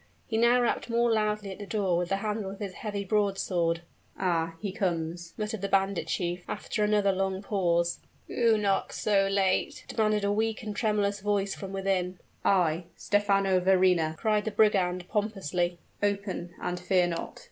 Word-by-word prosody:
He 220 - -4
now 235 +2 +5
rapped 240 0 0
more 235 0 +2
loudly 210 -2 0
at 190 - -9
the 205 - -7
door 195 -5 0
with 175 0 -1
the 195 - +2
handle 210 0 -2
of 195 - -8
his 200 -3 -4
heavy 205 -1 -4
broadsword. 190 -5 +1 0.4
"Ah! 165 -3 0
he 205 -2 -3
comes!" 170 -2 -3
muttered 215 -1 -3
the 200 - -1
bandit 195 -1 +1
chief, 175 0 -2
after 210 - -2
another 210 -1 +3
long 190 0 -1
pause. 175 -4 +1 0.3
"Who 230 -2 +3
knocks 200 -2 0
so 195 -2 +3
late?" 195 -1 0
demanded 215 -2 +1
a 200 - +2
weak 220 +2 0
and 210 -1 -5
tremulous 205 -2 +1
voice 200 -1 0
from 195 -1 -7
within. 190 -2 -1 0.3
"I 175 -3 +2
Stephano 195 -2 +2
Verrina!" 180 -4 +3
cried 210 +1 +1
the - - 0
brigand 185 -5 +2
pompously: 185 -5 -1 0.2
"open 200 -4 -2
and 180 0 -3
fear 180 0 +2
not." 170 -1 -4
195 Hz, 170 wpm, -28 LUFS, 180-210 Hz, 0.4 s, now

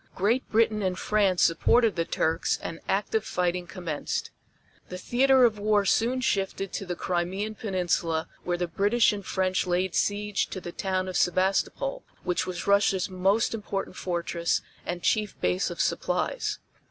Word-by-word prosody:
Great 225 +7 +1
Britain 220 -1 +2
and 185 -2 -1
France 200 -3 +2
supported 220 +7 +3
the 165 -1 0
Turks 160 0 0
and 165 - -5
active 210 +2 0
fighting 180 -2 -1
commenced. 165 -3 -4 0.6
The 180 - -5
theater 260 +5 +4
of 215 -3 +1
war 205 -1 +2
soon 240 +6 +2
shifted 195 -4 -1
to 195 - -4
the 175 - -2
Crimean 185 +5 -2
Peninsula 175 -6 -1 0.2
where 175 0 -1
the 175 - 0
British 205 +7 +3
and 200 -1 -5
French 185 0 0
laid 180 +1 0
siege 205 0 0
to 190 - -6
the 175 - -7
town 185 0 -2
of 185 - -2
Sebastopol 195 - +1 0.2
which 180 +1 -1
was 180 -2 -4
Russia's 200 -1 +2
most 195 +6 +2
important 200 -4 -4
fortress 170 -1 -1 0.2
and 175 0 -4
chief 215 -2 0
base 90 +1 +1
of - - -7
supplies. - - -1
190 Hz, 155 wpm, -27 LUFS, 180-210 Hz, 0.6 s, theater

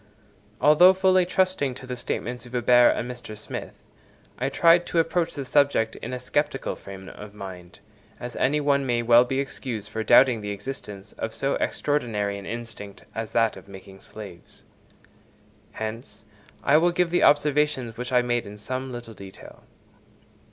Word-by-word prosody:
Although 175 +6 +6
fully 185 -1 +3
trusting 185 -8 0
to 130 - -10
the 125 -1 -5
statements 120 0 -4
of 120 - -15
Huber 120 0 +5
and 120 - -1
Mr. 120 -3 -9
Smith, 110 - -7 0.6
I - - 0
tried 170 +1 +4
to - - -3
approach 165 +1 +1
the 140 -2 -5
subject 130 -5 +2
in - - -7
a 125 - -4
sceptical 135 +2 -1
frame 95 -1 -11
of 105 0 -11
mind, 90 -3 -10 0.4
as 120 -1 -7
any 145 +4 +2
one 140 -1 +2
may 120 -1 +1
well 120 +1 +6
be 135 +2 -2
excused 125 -6 -5
for 110 +1 -3
doubting 125 +1 +5
the 105 - -5
existence 105 -2 -7
of 110 0 -4
so 135 - 0
extraordinary 105 -9 -1
an 100 - -10
instinct 115 -4 -8
as 115 -1 -5
that 115 -1 +2
of - - -13
making 95 0 -12
slaves. 100 -5 -11 1.1
Hence, 110 0 -7 0.4
I 145 - +5
will 175 +2 +3
give 175 -1 0
the 175 - +2
observations 145 -5 +2
which 125 +1 -5
I 125 -1 +4
made 120 -2 -1
in 105 +1 -10
some 130 +5 -5
little 120 -2 -8
detail. 95 -2 -13
120 Hz, 165 wpm, -25 LUFS, 110-145 Hz, 1.1 s, Although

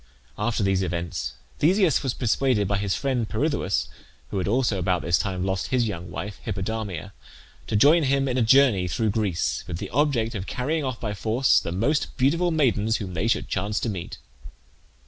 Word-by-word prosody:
After 105 0 -1
these 95 -1 +2
events 85 -6 -3 0.3
Theseus 180 -1 +3
was 130 -3 -2
persuaded 120 -3 +1
by 100 0 0
his 100 -2 -1
friend 130 -5 -1
Pirithoeus, 140 - 0 0.4
who 100 - -1
had 90 - -2
also 115 -2 +1
about 90 0 0
this 85 -1 +2
time 95 -2 -2
lost 95 -1 -1
his 125 -3 +1
young 90 -4 -5
wife, 100 +4 -6
Hippodamia, 100 -3 -4 0.5
to - - -1
join 150 +10 +6
him 135 -1 +1
in 125 - -1
a 130 - +2
journey 115 -6 +4
through 105 +5 0
Greece, 100 -6 -1
with - - -4
the - - -6
object 130 -5 +1
of 100 -3 -5
carrying 150 +5 -1
off 130 -3 -3
by 105 -3 -3
force 115 +6 +2
the - - -5
most 115 - 0
beautiful 165 +7 +2
maidens 115 -9 +2
whom 95 -4 -6
they 95 +6 -1
should 115 - 0
chance 100 +2 -1
to 115 - -1
meet. 90 -5 -6
110 Hz, 185 wpm, -25 LUFS, 95-130 Hz, 0.5 s, join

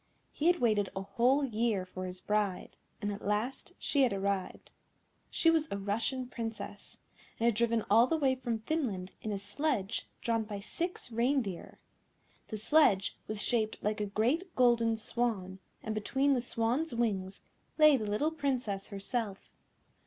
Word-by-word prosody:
He 310 - 0
had 350 0 +4
waited 215 -5 +2
a 190 - -3
whole 250 +8 +2
year 220 -5 0
for 185 0 -6
his 180 0 -6
bride, 210 -2 -1 0.3
and 205 - 0
at 200 - -8
last 240 - -2
she 285 - +1
had 255 -3 +4
arrived. 195 -1 -2 0.6
She 330 - +4
was 320 -1 +2
a 200 - -1
Russian 220 +6 -1
Princess, 225 -2 -6 0.4
and 230 - +1
had 235 - +5
driven 230 0 +1
all 230 +4 +6
the 325 - +1
way 275 -4 +3
from 240 -3 -2
Finland 220 - -2
in 215 - -3
a 200 - -1
sledge 205 +1 -2
drawn 230 -1 0
by 210 -1 -6
six 330 - -4
reindeer. 235 -5 -1 0.7
The 215 - -4
sledge 215 -4 +3
was 215 -1 -3
shaped 220 -3 0
like 210 0 0
a 210 - -1
great 260 - 0
golden 235 -2 +4
swan, 215 -4 -2 0.2
and 220 - -2
between 270 +7 +1
the 250 - +1
swan's 240 +5 -1
wings 195 -5 -1 0.4
lay 305 -2 +8
the 215 -5 -2
little 290 +10 +1
Princess 255 -10 -2
herself. 200 0 -4
225 Hz, 160 wpm, -32 LUFS, 205-260 Hz, 0.7 s, lay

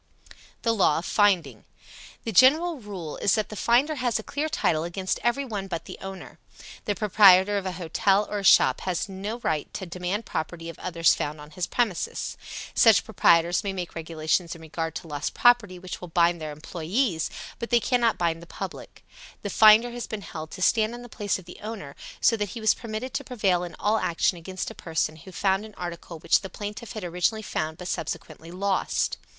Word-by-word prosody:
THE 230 - +2
LAW 190 -8 +3
OF 170 - -3
FINDING. 175 - +2 0.6
The 225 - -3
general 300 - +5
rule 190 -8 -7
is 195 - +2
that 215 - -1
the 215 - -7
finder 245 +8 +3
has 245 -3 0
a 220 - -5
clear 295 +6 -2
title 160 - +1
against 185 +2 -2
every 240 +5 +1
one 205 -6 -4
but 170 -3 -5
the - - -9
owner. 190 -1 -9 0.5
The 205 - 0
proprietor 200 -1 +6
of 190 - -5
a 185 - -3
hotel 195 +4 +1
or 210 - -3
a - - -6
shop - - +5
has 185 +3 -2
no 200 +4 -5
right 155 -2 -1
to 190 - -4
demand 180 +5 -3
property 165 +1 -4
of 165 - -10
others 165 -3 +3
found 150 +1 -3
on 150 +1 -12
his 180 0 -3
premises. 225 -8 -1 0.4
Such 220 -7 +6
proprietors 170 -5 +3
may 200 -1 -2
make 180 -2 -5
regulations 165 +1 -1
in 165 - -13
regard 160 0 -4
to 165 - -6
lost 145 -1 -4
property 240 -7 +4
which 180 0 -7
will 180 - -7
bind 170 0 +2
their 155 -1 -4
employes, 165 - -1 0.3
but 235 - -4
they 240 - +4
cannot 240 -1 +2
bind 165 -1 0
the 170 - -12
public. - - -8 0.4
The 205 - -3
finder 220 +2 +7
has 240 0 -6
been 210 -2 -5
held 160 -2 -7
to 185 - -5
stand 220 +3 +2
in 240 - -9
the 245 - -11
place 205 -2 -1
of 190 - -13
the 180 - -12
owner, 210 -10 -7 0.2
so 230 - +4
that 210 -2 -2
he 230 - -7
was 220 -1 +4
permitted 230 +2 -6
to - - -2
prevail 195 -8 0
in 175 - -7
all 215 +2 +1
action 170 +2 +1
against 185 +2 -5
a - - -9
person 160 -1 -2
who 175 +5 -12
found 195 +2 +1
an 215 -1 -11
article 170 -1 -6
which 155 - +3
the 195 - -7
plaintiff 210 +4 -7
had 215 - -6
originally 180 +5 0
found, 155 -5 -3
but 180 - -7
subsequently 165 0 -5
lost. 190 +2 -1
190 Hz, 205 wpm, -26 LUFS, 170-220 Hz, 0.6 s, finder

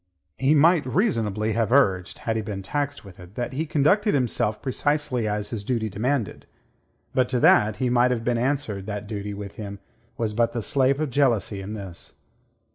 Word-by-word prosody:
He 140 +3 +3
might 160 +2 +5
reasonably 115 - 0
have 115 0 0
urged 95 -10 +2
had 115 - 0
he 110 - 0
been 100 -2 -5
taxed 145 +3 -3
with 95 -2 -13
it 90 +3 -13
that 120 +1 -3
he 155 +4 -2
conducted 190 +9 +2
himself 115 -4 0
precisely 140 -3 -1
as 105 0 -2
his 110 -4 -4
duty 110 -1 -1
demanded. 115 +3 -2 0.7
But 125 -1 +2
to 125 -1 0
that 105 0 +5
he 125 +3 -1
might 125 0 +4
have 120 -2 -1
been 120 0 0
answered 120 -7 -2
that 105 -1 -4
duty 105 -1 -5
with 100 -1 -8
him 100 -2 -6 0.4
was 110 -2 -1
but 115 +1 +1
the 120 - -2
slave 135 +1 +2
of 155 -4 -1
jealousy 120 -7 +1
in 100 +3 -6
this. 95 -5 -9
115 Hz, 190 wpm, -24 LUFS, 105-140 Hz, 0.7 s, might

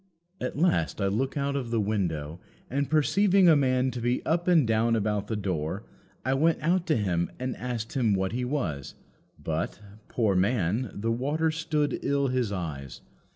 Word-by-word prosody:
"At 125 - -4
last 145 - +1
I 100 - +1
looked 130 +8 -1
out 140 0 -1
of 130 -4 -2
the 115 -1 +1
window, 85 -7 -2 0.3
and 140 +1 0
perceiving 190 +5 +4
a 165 - +7
man 130 -2 +2
to 120 0 -5
be 120 +2 0
up 170 +2 0
and 170 -6 +5
down 115 +1 +2
about 105 -2 -1
the 110 - -2
door, 95 -2 -2 0.4
I 130 - +2
went 160 +4 +3
out 175 +2 +1
to 155 - +3
him 90 -5 0
and 130 0 -2
asked 120 -3 -4
him 115 -7 +2
what 95 0 -1
he 125 +2 -2
was; 100 - -3 0.4
but, - - -3 0.3
poor 110 -5 +1
man, 105 +3 +1
the 115 +3 -2
water 145 +7 0
stood 155 -2 -1
ill 140 -1 +1
his 125 -4 0
eyes. 75 -9 -5
120 Hz, 180 wpm, -27 LUFS, 100-140 Hz, 0.4 s, a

